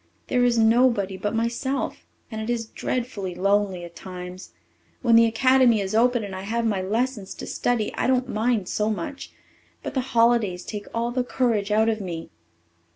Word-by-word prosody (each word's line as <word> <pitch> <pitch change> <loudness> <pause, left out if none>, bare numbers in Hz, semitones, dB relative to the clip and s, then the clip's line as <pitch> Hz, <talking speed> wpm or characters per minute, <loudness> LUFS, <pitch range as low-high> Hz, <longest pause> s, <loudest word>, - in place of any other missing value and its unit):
There 245 -1 +2
is 240 -1 +3
nobody 225 -3 +3
but 205 +3 -3
myself, 235 +4 -2 0.2
and 220 -1 -4
it 220 - -4
is 235 -1 -1
dreadfully 220 -6 -4
lonely 195 -1 +1
at 170 0 -13
times. 180 0 -8 0.5
When 235 -2 +5
the 230 0 +7
Academy 255 0 +4
is 195 0 -3
open 240 +1 +3
and 195 -2 -6
I 190 - -5
have 230 +4 -2
my 205 -4 0
lessons 215 +1 -2
to - - -7
study, 240 -3 -1
I - - -1
don't 255 -1 +2
mind 220 -4 0
so 210 0 0
much. 275 +6 -5 0.5
But - - -5
the 265 - +1
holidays 230 -7 +2
take 210 -2 -6
all 235 +1 -1
the 250 0 0
courage 230 -5 0
out 215 +1 +3
of 220 -1 0
me." 170 -4 -6
225 Hz, 180 wpm, -24 LUFS, 200-240 Hz, 0.5 s, the